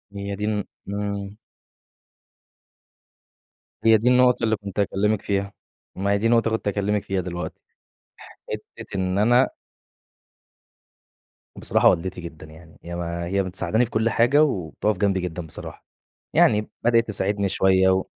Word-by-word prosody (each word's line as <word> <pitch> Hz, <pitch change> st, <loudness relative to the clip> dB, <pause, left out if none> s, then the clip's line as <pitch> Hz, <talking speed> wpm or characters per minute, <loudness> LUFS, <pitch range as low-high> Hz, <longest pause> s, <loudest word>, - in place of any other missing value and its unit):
هي 100 Hz, 0 st, -4 dB
دي 105 Hz, +1 st, -3 dB
الن 105 Hz, -2 st, -1 dB, 0.3 s
امم. 100 Hz, 0 st, -4 dB, 2.5 s
هي 115 Hz, -1 st, +7 dB
دي 120 Hz, +4 st, +2 dB
النقطة 125 Hz, -1 st, +4 dB
اللي 110 Hz, -1 st, +2 dB
كُنت 100 Hz, -1 st, -7 dB
هاكلمِك 100 Hz, +1 st, +1 dB
فيها، 100 Hz, 0 st, -2 dB, 0.4 s
ما 100 Hz, +2 st, -1 dB
هي 100 Hz, -, +3 dB
دي 110 Hz, +3 st, +1 dB
نقطة 115 Hz, -1 st, +3 dB
كُنت 110 Hz, -1 st, -2 dB
هاكلّمِك 100 Hz, 0 st, 0 dB
فيها 95 Hz, -1 st, -1 dB
دلوقتي، 85 Hz, -1 st, -6 dB, 0.9 s
حتّة -, -, -8 dB
إن 95 Hz, 0 st, -1 dB
أنا 120 Hz, +5 st, +4 dB, 2.1 s
بصراحة -, -, +3 dB
والدتي 90 Hz, +1 st, -1 dB
جدًا 80 Hz, -2 st, -9 dB
يعني 80 Hz, +1 st, -16 dB
هي 85 Hz, 0 st, -6 dB
ما 85 Hz, 0 st, -4 dB
هي 100 Hz, +2 st, 0 dB
مساعداني 95 Hz, +5 st, 0 dB
في 120 Hz, -, -12 dB
كل 110 Hz, +1 st, +1 dB
حاجة 125 Hz, +7 st, +4 dB
وبتقف 100 Hz, -, -1 dB
جنبي 100 Hz, 0 st, +1 dB
جدًا 90 Hz, -1 st, -5 dB
بصراحة، 80 Hz, -, -8 dB, 0.5 s
يعني 105 Hz, 0 st, +3 dB
بدأت 115 Hz, -1 st, +3 dB
تساعدني 100 Hz, -1 st, 0 dB
شويّة 95 Hz, 0 st, +3 dB
و 95 Hz, 0 st, +2 dB
100 Hz, 140 wpm, -23 LUFS, 95-110 Hz, 2.5 s, هي